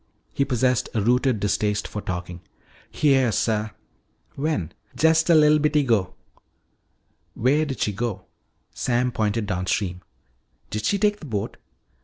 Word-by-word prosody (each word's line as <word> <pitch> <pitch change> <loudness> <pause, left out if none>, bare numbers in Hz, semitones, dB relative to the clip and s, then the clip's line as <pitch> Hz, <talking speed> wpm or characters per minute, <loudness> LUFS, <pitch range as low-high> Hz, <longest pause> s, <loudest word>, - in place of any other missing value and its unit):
He 140 - +1
possessed 125 -1 +1
a 110 - +2
rooted 125 0 +2
distaste 105 +1 0
for 105 - -6
talking. 90 -2 -5 0.5
"Heah, 135 -5 +2
suh." 110 -1 0 0.6
"When?" 135 - -2 0.2
"Jest 160 +1 +3
a 170 - +7
li'l 150 0 +5
bitty 150 0 +2
'go." 105 -8 0 1.2
"Where 145 +6 +2
did 135 -3 -5
she 105 - 0
go?" 100 -2 -4 0.5
Sam 125 +1 0
pointed 110 -1 -1
downstream. 90 -1 -2 0.7
"Did 110 0 -3
she 200 - +2
take 205 0 +1
the 155 - -10
boat?" 105 -5 -4
120 Hz, 135 wpm, -23 LUFS, 105-145 Hz, 1.2 s, a